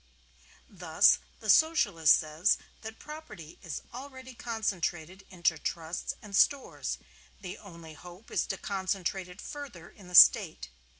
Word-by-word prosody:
Thus 180 -1 +3 0.2
the 215 - -6
Socialist 200 - +4
says 155 +6 0 0.2
that 220 0 -9
property 215 - -11
is 170 -5 -7
already 260 0 -10
concentrated 190 -6 -4
into 170 -3 0
Trusts 165 0 -4
and 205 -2 -7
Stores: 280 +6 +1 0.4
the 185 -3 -8
only 170 -5 -12
hope 180 +6 -14
is - - -1
to - - -4
concentrate 190 -1 -3
it 180 +2 -14
further 265 - -9
in 195 - -17
the 180 - -6
State. 60 - +6
190 Hz, 130 wpm, -29 LUFS, 170-220 Hz, 0.4 s, State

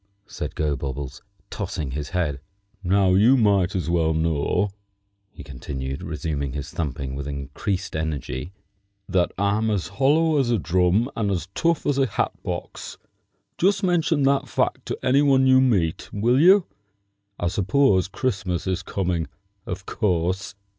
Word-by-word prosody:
said - - -6
Gobobbles, 70 -2 -3 0.3
tossing 90 -9 -4
his 75 +2 -4
head. 85 -6 -1 0.4
"Now 95 0 +3
you 110 +8 +5
might 100 -5 +2
as 90 -5 -1
well 80 -2 +1
know," 80 +5 0 0.6
he 100 - -12
continued, 65 +1 -6
resuming 75 -5 -3
his 70 -1 -5
thumping 70 -4 -4
with 70 +1 -5
increased 70 +8 -4
energy, 80 -1 -3 0.6
"that 90 -2 +1
I'm 100 +3 +1
as 100 -5 -1
hollow 150 +3 +3
as 130 -3 +1
a 120 - +3
drum 90 +7 +1
and 105 -3 0
as 95 -2 -2
tough 170 -2 +1
as 140 -1 +1
a 135 - +3
hat - - -1
box. - - -6 0.6
Just 195 +3 +2
mention 165 -5 +2
that 135 0 +2
fact - - -1
to - - -3
any 135 +3 +4
one 135 -2 +4
you 130 0 +6
meet, 95 -11 +1
will 120 +6 +2
you? 185 +4 +6 0.7
I 90 - 0
suppose 100 +1 +2
Christmas 95 -5 -2
is 95 0 -1
coming, 90 -3 -2 0.4
of 95 +1 -5
course." 95 -2 -1
95 Hz, 145 wpm, -23 LUFS, 80-120 Hz, 0.7 s, you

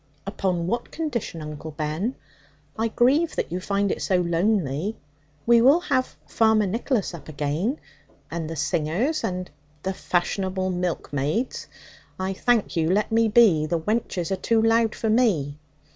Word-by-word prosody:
'Upon 185 -4 -1
what 235 +7 -2
condition, 240 - -4
Uncle 150 +1 -7
Ben? 155 - -3 0.6
I 225 +1 0
grieve 270 +9 +2
that - - -2
you 180 - -2
find 200 +1 0
it - - -3
so 190 - +1
lonely. 175 0 0 0.5
We 235 0 +6
will 275 +7 +6
have 255 -7 -1
Farmer 220 -2 +3
Nicholas 225 +1 -1
up 160 -3 -10
again, 155 - -1 0.5
and 165 -2 -3
the 165 - -4
singers, 170 - 0
and 180 -2 -3 0.2
' 150 0 -35
'The 190 - -1
fashionable 185 +1 -1
milkmaids. 175 - -2 0.5
I 190 +1 -1
thank 230 +1 +1
you, 160 -1 +1
let 210 +4 +1
me 225 0 +3
be. 205 -9 +5
The 170 +1 0
wenches 195 -2 -2
are - - +2
too 230 +3 +1
loud 225 0 +3
for 220 - -1
me. 165 - +1
190 Hz, 155 wpm, -24 LUFS, 165-230 Hz, 0.6 s, We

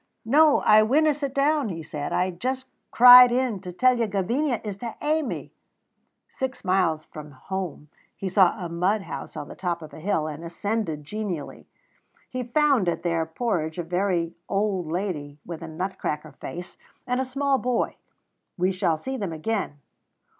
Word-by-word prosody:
"No, 295 +5 +5
I 215 0 +6
winna 295 +8 +3
sit 280 -1 -4
down," 280 -2 +1
he 165 -3 -5
said; 150 -2 -5
"I 185 +1 +1
just 260 +9 -3 0.2
cried 250 0 +10
in 245 -4 0
to 180 -2 -7
tell 250 +7 +3
you 230 - +1
Gavinia 230 +7 0
is 205 -3 -5
to 230 +2 -6
hae 310 +2 +1
me." 280 - -5 0.8
Six 265 -5 -5
miles 180 -5 +1
from 150 -1 -10
home 165 +2 -6 0.3
he 195 - -4
saw 185 -1 +3
a - - -2
mud 185 +5 0
house - - -7
on 145 -1 -5
the - - -9
top 170 -3 -3
of 155 - -11
a - - -9
hill, 160 -2 0
and 155 +1 -6
ascended 170 -2 -3
genially. 180 -2 -5 0.6
He 255 - -3
found 250 - +2
at 170 - -3
their 165 -2 0
porridge 160 -4 -2
a 175 - -2
very 175 -1 0 0.2
old 195 -4 0
lady 165 -6 -3
with 170 -1 -7
a 165 - -6
nut 180 +5 -4
cracker 150 0 -3
face, 175 +1 -8 0.3
and 250 +1 0
a - - +1
small 275 +1 0
boy. 245 -1 -1 0.6
We 185 +1 +2
shall 170 -3 0
see 265 +11 -5
them 200 -7 -3
again. 160 -4 -3
195 Hz, 175 wpm, -25 LUFS, 165-250 Hz, 0.8 s, cried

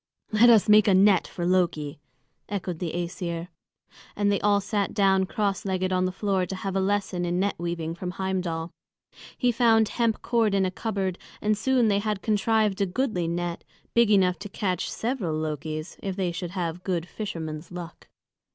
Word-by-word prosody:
"Let 225 +3 +6
us 225 -4 +6
make 210 +1 +6
a 195 - +5
net 195 -1 +5
for 175 - -4
Loki," 170 -6 0 0.5
echoed 185 -4 -3
the 175 -3 -2
Æsir. 170 0 -4 0.7
And 205 0 +2
they 200 - +1
all 205 -1 +3
sat 200 0 -2
down 190 -2 +3
cross 200 -1 -1
legged 185 -1 -1
on 185 0 +2
the 185 - 0
floor 190 -1 0
to 195 - -4
have 190 0 -4
a - - +2
lesson 190 -2 0
in 175 +1 0
net 200 +1 +1
weaving 170 -1 -3
from 180 +1 -5
Heimdal. 180 -4 -2 0.7
He 245 -2 +2
found 225 -2 +4
hemp 230 -2 0
cord 230 -4 +2
in 195 -1 +3
a 185 - -1
cupboard, 190 -3 -2 0.2
and 210 0 +1
soon 245 +2 +2
they 200 -1 +2
had 210 -2 -2
contrived 215 -1 +1
a 200 - +2
goodly 185 -4 -1
net, 170 +1 -3 0.3
big 235 -2 +4
enough 185 -3 +3
to 205 - -7
catch 185 -3 -2
several 220 - -2
Lokis, 155 +1 -4
if 195 -2 -3
they 185 -3 -1
should 175 0 -5
have 175 0 -3
good 175 -3 -1
fisherman's 165 -7 -6
luck. 175 -1 -9
190 Hz, 185 wpm, -26 LUFS, 175-210 Hz, 0.7 s, Let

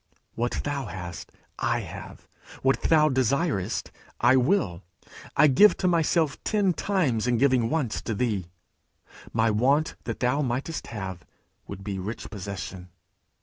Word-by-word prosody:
'What 120 +1 -1
thou 140 -4 -3
hast, 85 -2 -7 0.3
I - - +1
have; - - -10 0.4
what 135 0 +2
thou 155 -2 +4
desirest, 130 - 0 0.3
I 120 +2 +5
will; 130 - +2 0.6
I - - +7
give 155 +9 +6
to 185 - 0
myself 165 -3 +1
ten 200 -4 +2
times 150 - 0
in 120 -1 +2
giving 130 -3 +3
once 150 -9 -1
to 110 - 0
thee. 100 -6 -1 0.8
My 115 0 +2
want 135 +9 +2
that 115 - -4
thou 125 +4 +1
mightst 135 +4 -3
have, 95 -5 -6 0.4
would 95 - -8
be 95 -1 -4
rich 105 +5 -6
possession.' 95 -2 -6
125 Hz, 140 wpm, -26 LUFS, 105-150 Hz, 0.8 s, I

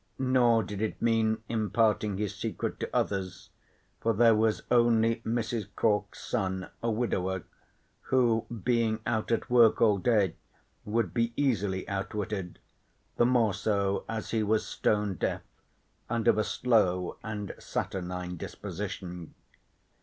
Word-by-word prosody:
Nor 125 -3 +3
did 105 0 -6
it 110 - -2
mean 110 -1 +1
imparting 110 -2 +1
his 105 -1 -2
secret - - -4
to - - -3
others, 95 -2 -2 0.5
for 115 - +1
there 115 +2 +5
was 110 0 +1
only 115 -1 +4
Mrs. 115 -2 -2
Cork's 105 -2 0
son, 95 -5 -2
a 115 - 0
widower, 95 -6 -1 0.7
who 120 -4 +2 0.2
being 115 -3 +1
out 115 -1 -1
at 115 - 0
work 120 -3 +6
all 105 -4 +4
day 105 -5 +2 0.5
would 105 -4 0
be 115 0 0
easily 100 -9 0
outwitted, 100 -1 -3 0.6
the 120 - +4
more 120 -5 +3
so 100 -1 0
as 110 -1 -4
he 115 - +1
was 110 +1 +1
stone 105 -2 0
deaf - - -1 0.7
and 115 -1 -1
of 110 - +5
a - - +3
slow 95 -9 +1
and 105 -2 -5
saturnine 90 -1 -4
disposition. 90 -3 -6
110 Hz, 130 wpm, -29 LUFS, 100-115 Hz, 0.7 s, work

